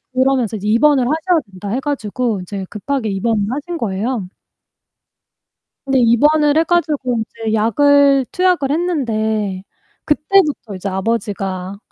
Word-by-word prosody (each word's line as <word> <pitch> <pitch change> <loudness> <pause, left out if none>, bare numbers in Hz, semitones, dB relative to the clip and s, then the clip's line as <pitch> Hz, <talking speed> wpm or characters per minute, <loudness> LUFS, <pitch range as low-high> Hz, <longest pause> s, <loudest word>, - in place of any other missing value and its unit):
그러면서 255 -4 +1
이제 205 +1 -4
입원을 260 +4 +4
하셔야 320 +6 +1
된다 190 +1 -8
해 250 - -1
가지고 245 -6 -2
이제 195 +1 -6
급하게 225 +1 -3
입원을 205 +2 0
하신 315 +5 -4
거예요. 210 0 -2 1.6
근데 270 -1 +2
입원을 295 +6 +3
해 325 - +4
가지고 300 -8 0
이제 220 0 -4
약을 275 +5 +4
투약을 360 -7 +1
했는데 220 - -1 0.4
그때부터 300 - +1
이제 190 +2 -4
아버지가 195 -2 -3
240 Hz, 300 characters per minute, -17 LUFS, 210-290 Hz, 1.6 s, 입원을